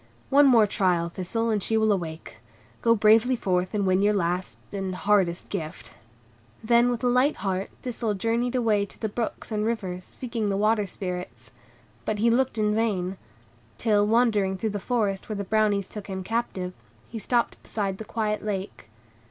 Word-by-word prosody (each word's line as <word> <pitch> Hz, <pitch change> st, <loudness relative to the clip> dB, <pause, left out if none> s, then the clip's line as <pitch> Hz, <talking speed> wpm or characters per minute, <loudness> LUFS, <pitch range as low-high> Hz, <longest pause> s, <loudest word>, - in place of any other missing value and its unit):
"One 285 Hz, +1 st, +7 dB
more 235 Hz, -5 st, +6 dB
trial, 180 Hz, -4 st, +1 dB
Thistle, 225 Hz, +6 st, -2 dB
and 210 Hz, -2 st, 0 dB
she 225 Hz, +4 st, 0 dB
will 220 Hz, -1 st, +3 dB
awake. 165 Hz, -, -4 dB, 0.4 s
Go 230 Hz, 0 st, +4 dB
bravely 220 Hz, +4 st, +5 dB
forth 185 Hz, -3 st, -1 dB
and 200 Hz, -2 st, +1 dB
win 185 Hz, 0 st, +3 dB
your 205 Hz, +1 st, +3 dB
last 180 Hz, -1 st, -1 dB, 0.2 s
and 190 Hz, -2 st, -3 dB
hardest 190 Hz, -3 st, +1 dB
gift." 160 Hz, -6 st, -5 dB, 0.7 s
Then 235 Hz, +2 st, +4 dB
with 245 Hz, 0 st, -2 dB
a -, -, +3 dB
light 250 Hz, +4 st, +3 dB
heart 190 Hz, 0 st, -1 dB
Thistle 230 Hz, -4 st, -2 dB
journeyed 230 Hz, +5 st, 0 dB
away 220 Hz, -5 st, +2 dB
to 200 Hz, -, -9 dB
the 220 Hz, -, -1 dB
brooks 225 Hz, +1 st, -4 dB
and 210 Hz, -1 st, 0 dB
rivers, 195 Hz, -5 st, -2 dB
seeking 230 Hz, 0 st, -4 dB
the 195 Hz, -, 0 dB
Water 210 Hz, 0 st, +2 dB
Spirits. 180 Hz, -, -6 dB, 0.5 s
But 210 Hz, -, -1 dB
he 230 Hz, +3 st, +3 dB
looked 255 Hz, 0 st, +1 dB
in 210 Hz, -1 st, +2 dB
vain; 195 Hz, -4 st, 0 dB, 0.6 s
till, 210 Hz, -2 st, +2 dB
wandering 210 Hz, -4 st, +2 dB
through 220 Hz, +3 st, -2 dB
the 205 Hz, -, -3 dB
forest 205 Hz, -4 st, -1 dB
where 215 Hz, -, -2 dB
the 200 Hz, -, -3 dB
Brownies 205 Hz, -1 st, +1 dB
took 210 Hz, -2 st, -8 dB
him 190 Hz, -1 st, -4 dB
captive, 190 Hz, -4 st, -2 dB, 0.3 s
he 230 Hz, -, -6 dB
stopped 235 Hz, +2 st, 0 dB
beside 195 Hz, -3 st, -3 dB
the -, -, -5 dB
quiet 215 Hz, -1 st, -2 dB
lake. 195 Hz, -, -5 dB
210 Hz, 175 wpm, -26 LUFS, 190-230 Hz, 0.7 s, One